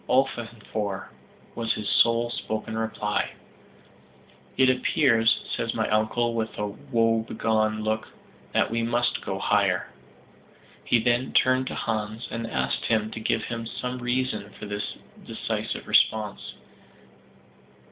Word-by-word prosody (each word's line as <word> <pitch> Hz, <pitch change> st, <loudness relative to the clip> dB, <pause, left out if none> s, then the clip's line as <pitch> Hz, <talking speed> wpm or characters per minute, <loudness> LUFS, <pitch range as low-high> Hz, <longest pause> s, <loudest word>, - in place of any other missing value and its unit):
"Ofvanfor," 115 Hz, -6 st, -1 dB, 0.4 s
was 115 Hz, -1 st, 0 dB
his 105 Hz, -, -4 dB
sole 115 Hz, 0 st, +4 dB
spoken 110 Hz, -1 st, -3 dB
reply. 110 Hz, -2 st, -1 dB, 1.2 s
"It 130 Hz, 0 st, +6 dB
appears," 125 Hz, -2 st, +3 dB
says 115 Hz, 0 st, -2 dB
my 110 Hz, -1 st, 0 dB
uncle 110 Hz, +2 st, +1 dB
with 110 Hz, -1 st, -3 dB
a 105 Hz, -, -1 dB
woebegone 110 Hz, 0 st, 0 dB
look, 110 Hz, 0 st, -1 dB, 0.4 s
"that -, -, +2 dB
we 115 Hz, 0 st, 0 dB
must 120 Hz, +1 st, +1 dB
go -, -, -3 dB
higher." -, -, +2 dB, 0.9 s
He -, -, +3 dB
then 120 Hz, +3 st, +1 dB
turned 130 Hz, 0 st, +4 dB
to -, -, -4 dB
Hans, 110 Hz, +1 st, -2 dB
and 115 Hz, 0 st, -3 dB
asked 65 Hz, 0 st, -1 dB
him 110 Hz, -1 st, +1 dB
to 110 Hz, -, -5 dB
give 110 Hz, -, 0 dB, 0.3 s
some 125 Hz, 0 st, -3 dB
reason 125 Hz, -4 st, -1 dB
for -, -, -7 dB
this 100 Hz, 0 st, -3 dB, 0.3 s
decisive -, -, -3 dB
response. 110 Hz, -2 st, +2 dB
115 Hz, 120 wpm, -26 LUFS, 110-120 Hz, 1.2 s, It